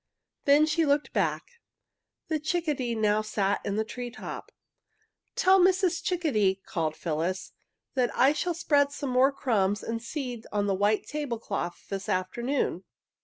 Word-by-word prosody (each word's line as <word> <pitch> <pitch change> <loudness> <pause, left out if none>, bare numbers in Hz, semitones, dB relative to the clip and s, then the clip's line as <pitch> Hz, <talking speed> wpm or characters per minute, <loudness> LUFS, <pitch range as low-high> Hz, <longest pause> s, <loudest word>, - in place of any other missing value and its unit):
Then 290 +1 +6
she 320 +2 +1
looked 290 0 +1
back. 475 -1 -2 0.7
The 315 -2 0
chickadee 300 -7 -1
now 215 -1 +2
sat 205 -2 0
in 200 - -2
the 220 - +1
tree 245 +2 -6
top. 240 - -8 0.8
"Tell 380 +1 +5
Mrs. 370 -1 +3
Chickadee," 215 - +1
called 160 -2 -2
Phyllis, 170 +4 -2 0.4
"that 250 -3 +2
I 270 +3 +5
shall 345 +2 -1
spread 285 -4 +2
some 285 -2 -4
more 255 +2 +5
crumbs 205 -7 0
and 230 0 -3
seeds 245 -2 -5
on 205 -1 0
the 200 - +1
white 205 +2 +1
table 290 -6 -3
cloth 195 -5 -4
this 195 +1 -4
afternoon. 205 +2 -1
245 Hz, 150 wpm, -28 LUFS, 205-300 Hz, 0.8 s, Then